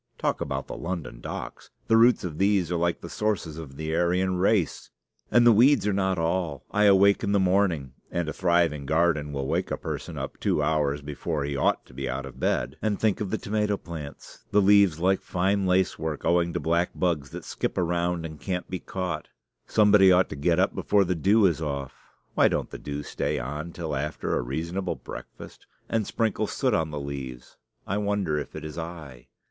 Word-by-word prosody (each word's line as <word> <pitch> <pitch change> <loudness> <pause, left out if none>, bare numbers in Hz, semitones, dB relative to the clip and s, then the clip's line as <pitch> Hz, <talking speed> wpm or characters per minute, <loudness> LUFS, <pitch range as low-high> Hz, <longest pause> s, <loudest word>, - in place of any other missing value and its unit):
Talk - - -1
about - - -3
the - - -7
London 85 -9 -5
docks! - - -7 0.2
the 115 - +4
roots 120 +2 +5
of 80 -4 -5
these 95 -3 +2
are - - +1
like 85 0 0
the - - -7
sources 85 -6 -2
of 70 -4 -9
the 80 +1 -2
Aryan 90 +2 +1
race. 95 -2 +1 0.4
And 120 0 +5
the 120 - +8
weeds 120 +1 +5
are 105 - +1
not 95 -1 +1
all. 80 -3 -1
I 105 +1 +3
awake 100 0 +5
in 100 - 0
the 100 - +4
morning 90 -8 +1 0.2
(and 85 -2 -2
a 75 - -3
thriving 85 -6 +1
garden 80 -2 +1
will 70 -1 -3
wake - - -1
a - - -2
person - - -5
up - - -6
two 75 - +1
hours 75 -2 0
before 75 +1 -3
he 70 0 -3
ought 70 - +1
to - - -18
be 65 0 -4
out 65 +2 -3
of 70 - -11
bed) - - -1
and 105 -2 0
think 110 -2 +1
of 100 - -2
the 110 - -1
tomato 105 -1 -1
plants 80 -6 -9
the 105 - +3
leaves 100 -4 +5
like 95 +2 +2
fine 95 +2 0
lace 90 -2 +2
work, 80 -2 -4
owing 85 0 +2
to - - -1
black 85 +2 +1
bugs 80 -6 0
that - - -8
skip - - -3
around 85 -1 0
and 80 -2 -8
can't 90 -2 -3
be 90 - -2
caught. 95 -1 -4 0.4
Somebody 105 -3 +6
ought 90 0 +4
to - - -5
get 85 +4 +1
up 95 - +2
before 100 -1 +2
the 90 - 0
dew 100 +6 +3
is 85 -4 +2
off 70 -4 -3 0.4
(why - - +5
don't - - -2
the - - -7
dew 75 0 -5
stay - - -2
on 75 +7 -5
till 80 -3 -4
after 75 +3 -2
a - - +1
reasonable 85 +9 -3
breakfast?) - - -11 0.2
and 110 -3 -1
sprinkle 110 -2 0
soot 130 +1 0
on 80 -3 +1
the 75 -1 -4
leaves. 65 -3 -7 0.3
I 100 +2 -1
wonder 100 -7 0
if - - -7
it - - -6
is 75 +2 -6
I. 80 -7 -8
85 Hz, 210 wpm, -26 LUFS, 75-95 Hz, 0.4 s, the